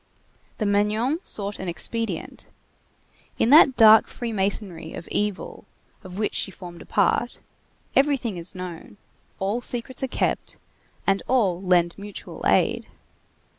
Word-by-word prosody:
The 215 - -1
Magnon 210 +8 +1
sought 205 - -3
an 190 - -5
expedient. 225 +6 -2 0.9
In 235 - +2
that 280 -3 +7
dark 220 -1 +8
free 235 -2 -5
masonry 190 -5 -3
of 170 - -8
evil 205 -2 -3 0.4
of 185 -1 -9
which 210 0 -1
she - - 0
formed 175 -3 -11
a - - -13
part, - - +1 0.6
everything 270 -7 +2
is 170 +3 -6
known, 180 +2 -8 0.4
all 200 +5 -1
secrets 245 +1 -3
are 265 - 0
kept, - - -1 0.5
and 195 0 +2
all 195 -9 +2
lend 175 -2 +3
mutual 205 0 -9
aid. - - +2
205 Hz, 130 wpm, -24 LUFS, 185-230 Hz, 0.9 s, dark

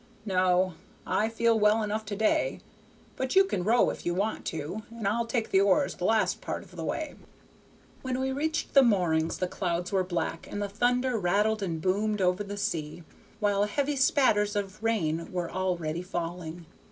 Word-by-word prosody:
No. 185 -2 +2 0.3
I 220 +1 +1
feel 230 0 +2
well 210 +1 +4
enough 215 +1 -2
to 205 0 -4
day, 220 - +1 0.6
but 260 +4 -2
you 385 - +8
can 290 - -2
row 230 +5 +4
if - - -9
you 175 - -1
want 205 +4 -1
to, 160 +7 -4
and 230 -3 -4
I'll 230 +3 0
take 230 -3 -1
the 190 - +5
oars 200 -2 +3
the 180 - -4
last 220 +1 +2
part - - -4
of - - -17
the - - -5
way." - - -3 0.9
When 260 -1 -2
we 265 0 0
reached 315 +4 -2
the 275 - +8
moorings 175 -9 +2
the 185 - -1
clouds 180 -1 -2
were 190 -2 +2
black, 175 -2 -3
and 205 - -4
the 205 - -1
thunder 245 +3 +1
rattled 210 +4 +1
and 170 -5 -2
boomed 205 +5 0
over 180 +2 +1
the 205 0 -6
sea, 165 -4 -3 0.4
while 205 -1 +2
heavy 285 +7 -1
spatters 240 -7 +3
of 205 +1 -3
rain 165 -8 0
were 180 -2 -3
already 175 -3 -2
falling. 175 -1 -5
205 Hz, 185 wpm, -28 LUFS, 180-225 Hz, 0.9 s, you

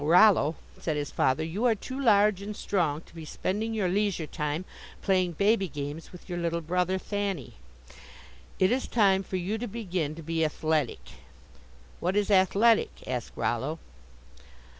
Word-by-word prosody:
"Now, 145 - -2
Rollo," 175 -3 +6 0.2
said 155 -3 -2
his 145 -1 -3
father, 130 +4 +1
"you 180 +9 -2
are 235 -2 +4
too 260 +6 -6
large 210 -5 +4
and 210 +1 -5
strong 160 -6 0
to - - -21
be 165 -1 -8
spending 210 +8 -2
your 205 -4 +1
leisure 195 -3 0
time 150 +2 -3 0.4
playing 185 -2 +2
baby 200 +3 +2
games 145 +1 -6
with 180 - -13
your 175 -1 -3
little 170 0 -1
brother 180 +3 0
Thanny. 195 - -3 1.0
It 185 +2 +3
is 255 +1 0
time 195 -4 +3
for 190 - -6
you 190 +5 -2
to 245 - -3
begin 185 -9 -3
to 165 - -9
be 165 +1 0
athletic." 155 -3 0 1.0
"What 180 +3 -1
is 205 0 +1
athletic?" 200 +4 +3
asked 125 -3 -3
Rollo. 135 +7 -1
180 Hz, 160 wpm, -28 LUFS, 160-205 Hz, 1.0 s, Rollo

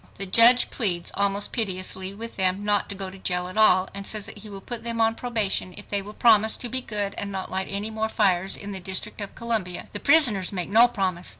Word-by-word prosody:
The 195 - -3
judge 230 +6 +6
pleads 180 -8 -2
almost 200 0 +1
piteously 190 -2 -3
with 230 +2 -8
them 190 +1 -1
not 205 -1 0
to 200 - -6
go 190 -1 -5
to 195 - -12
jail 180 -1 -1
at 185 - -9
all, 215 -3 +4
and 200 0 -6
says 215 -2 -1
that 210 - -8
he 210 +1 -10
will 200 -1 -9
put 235 +3 -6
them 230 -1 -4
on 225 0 +2
probation 220 -6 -2
if 205 - -12
they 200 -1 0
will 210 +2 -11
promise 220 -2 +4
to 245 - -3
be 260 +2 +2
good 205 -4 -3
and 200 - -4
not 190 -1 -5
light 190 0 -2
any 205 +2 -3
more 220 0 -3
fires 190 -3 +2
in 205 - -8
the 190 - -3
District 190 +3 -3
of 200 - -8
Columbia. 220 -7 -1
The 205 - -4
prisoners 250 - +4
make 180 -3 -4
no 230 +4 +5
promise. 185 -6 -3
200 Hz, 240 wpm, -23 LUFS, 190-220 Hz, -, judge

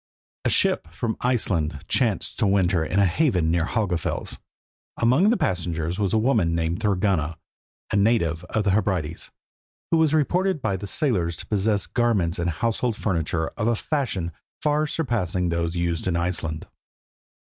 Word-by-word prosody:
A - - +3
ship - - +2
from 110 +6 -2
Iceland 85 - 0
chanced 115 -7 0
to 110 - +3
winter 95 -3 +2
in 90 - -2
a 100 - +5
haven 90 - +2
near 85 -1 +1
Helgafels. 100 -8 -2 0.6
Among 130 - +4
the 240 - +3
passengers 85 - -1
was 100 -3 +1
a 110 - +2
woman 110 -8 +2
named 85 +1 -1
Thorgunna, 95 -6 0 0.5
a - - 0
native 100 -6 +2
of 105 +4 -1
the 100 - +2
Hebrides, 95 -6 -1 0.6
who 165 - +4
was 160 -1 +3
reported 180 +4 +1
by 100 - -1
the 100 +2 -5
sailors 95 - +1
to - - -8
possess 105 -1 +1
garments 100 -9 +1
and 85 0 0
household 115 +6 -1
furniture 85 -6 -1
of 105 - -3
a 120 - +3
fashion 110 - -2 0.3
far 150 0 +1
surpassing 95 - -1
those 85 0 -1
used 85 0 -1
in 90 - +1
Iceland. 85 -2 -1
95 Hz, 160 wpm, -24 LUFS, 85-115 Hz, 0.6 s, a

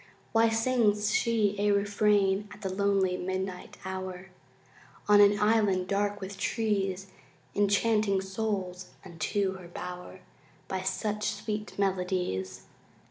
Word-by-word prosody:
Why 225 0 +4
sings 225 -3 +2
she 220 -4 +2
a 205 0 +2
refrain 205 0 +2
At 210 0 -12
the 190 -1 -2
lonely 195 -2 +1
midnight 185 0 -4
hour 190 0 -5 0.8
On 205 0 +7
an 205 0 +5
island 210 -4 +2
dark 205 +1 0
with 195 0 -7
trees, 195 -4 -1 0.4
Enchanting 205 0 +2
souls 190 -2 -3
unto 190 +3 -2
her 180 - -11
bower 180 +1 -8 0.5
By 190 -1 -2
such 210 +2 -2
sweet 210 -1 -5
melodies? 180 - -1
200 Hz, 115 wpm, -29 LUFS, 185-210 Hz, 0.8 s, On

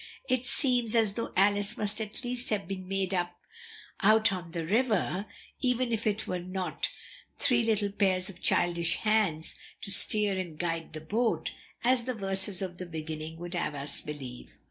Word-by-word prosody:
It 255 0 0
seems 245 -5 +6
as 220 -3 +3
though 230 +2 -5
'Alice' 205 +3 +4
must 210 0 +3
at 215 +4 -4
least 245 0 -1
have 205 -5 -2
been 185 -1 -7
made 195 0 -2
up 175 -1 -3 0.6
out 220 +1 +4
on 175 -3 -7
the 165 -1 -5
river, 210 -1 0 0.3
even 250 -2 0
if 225 0 -3
there 210 -2 +1
were 180 - -4
not 185 +1 -4 0.5
three 240 -3 +2
little 210 -3 +1
pairs 190 -2 +1
of 180 -3 -9
childish 170 -1 +2
hands 210 -8 +1 0.3
to 200 - 0
steer 205 -1 +5
and 170 -4 -7
guide 165 -1 -3
the 155 - -5
boat, 225 +9 -1 0.3
as 245 -1 +2
the 255 -1 -3
verses 195 -1 -1
at 180 -1 -7
the 180 - -7
beginning 160 -1 -7
would 175 +1 -8
have 155 -4 -3
us 140 +1 +2
believe." 135 -5 -10
195 Hz, 175 wpm, -28 LUFS, 175-220 Hz, 0.6 s, seems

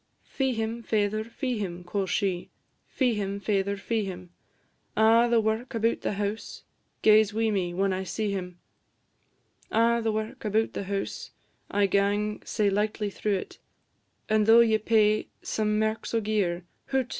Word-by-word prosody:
"Fee 265 -2 -1
him, 225 +1 -3
faither, 215 -1 0
fee 240 +1 -3
him," 180 -3 -4
quo' 190 +2 -2
she; 185 -2 -1 0.4
"Fee 250 -3 +1
him, 200 -1 -3
faither, 200 0 0
fee 220 +2 -1
him; 180 -2 -7 0.7
A' 225 +2 +5
the 235 -1 +4
wark 225 +4 -1
about 230 +1 +1
the - - -1
house 205 +2 -4 0.4
Gaes 215 -1 +5
wi' 225 0 +1
me 185 -4 0
when 195 +1 +1
I 185 +1 -2
see 205 +3 -2
him: 180 -2 -5 1.1
A' 235 +1 +3
the 225 -1 0
wark 215 0 -4
about 220 +1 0
the 200 - -4
house 195 0 -4 0.4
I 205 0 +2
gang 205 +2 +1
sae 210 -3 0
lightly 210 +1 -1
through 205 +1 -1
it; 185 - -6 0.7
And 215 0 +2
though 230 +1 +8
ye 220 -2 +3
pay 215 -1 +3 0.2
some 210 -1 0
merks 220 +1 -1
o' - - +4
gear, 200 -5 0 0.2
Hoot! 265 -2 0
210 Hz, 160 wpm, -27 LUFS, 200-225 Hz, 1.1 s, though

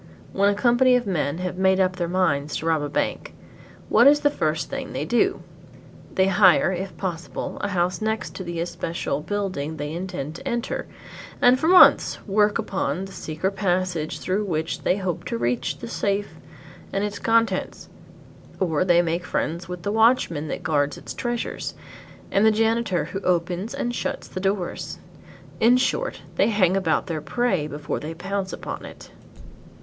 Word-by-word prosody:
When 200 +1 +3
a 205 - +1
company 245 +3 +4
of 245 - +1
men 160 -6 -1
have 180 0 -4
made 190 0 +3
up 185 -1 +1
their 175 -2 -1
minds 150 -5 0
to - - -6
rob 160 -2 +2
a 145 - -3
bank, - - -2 0.5
what 235 +4 +6
is 295 +1 +6
the 290 -1 +3
first 155 - -1
thing 275 -1 -5
they - - -2
do? 240 0 +1 0.7
They 190 - +4
hire, 190 -1 +5
if 190 +1 -5
possible, 175 -3 -4
a - - 0
house 180 -1 0
next 220 0 -2
to 190 - -6
the 170 -1 -5
especial 165 -4 -3
building 185 -5 -3
they 145 +1 -4
intend 175 -4 -4
to 270 - -8
enter, 240 -1 -2 0.5
and 250 +1 +5
for 320 - 0
months 365 +1 +7
work 210 0 +2
upon 185 -1 -2
the 195 - -11
secret 160 +2 -3
passage 185 -4 -1
through 195 +3 -1
which 160 -5 -2
they 185 - +1
hope 185 -4 -3
to - - -2
reach 120 +1 -1
the 115 - -7
safe 200 - -1 0.6
and 195 - -1
its 205 -1 -3
contents; 230 0 0 0.7
or 170 -4 +1
they 175 -1 +4
make 170 +1 -1
friends 170 +1 -3
with 180 -1 -6
the 205 - -1
watchman 220 - +3
that - - -5
guards 145 -3 0
its - - -8
treasures, 240 -1 -3 0.6
and 195 - +3
the 220 - +7
janitor 225 -3 +1
who 195 - -5
opens 180 +3 -1
and 240 -3 -2
shuts - - -3
the - - -6
doors. 195 -1 -2 0.6
In 240 +3 +5
short 370 - -1
they - - +4
hang 195 -5 +3
about 175 -5 +1
their 160 -3 -3
prey 190 -8 0
before 150 0 -4
they 160 +2 -6
pounce 190 +2 -3
upon - - -6
it. - - -11
185 Hz, 175 wpm, -24 LUFS, 165-215 Hz, 0.7 s, months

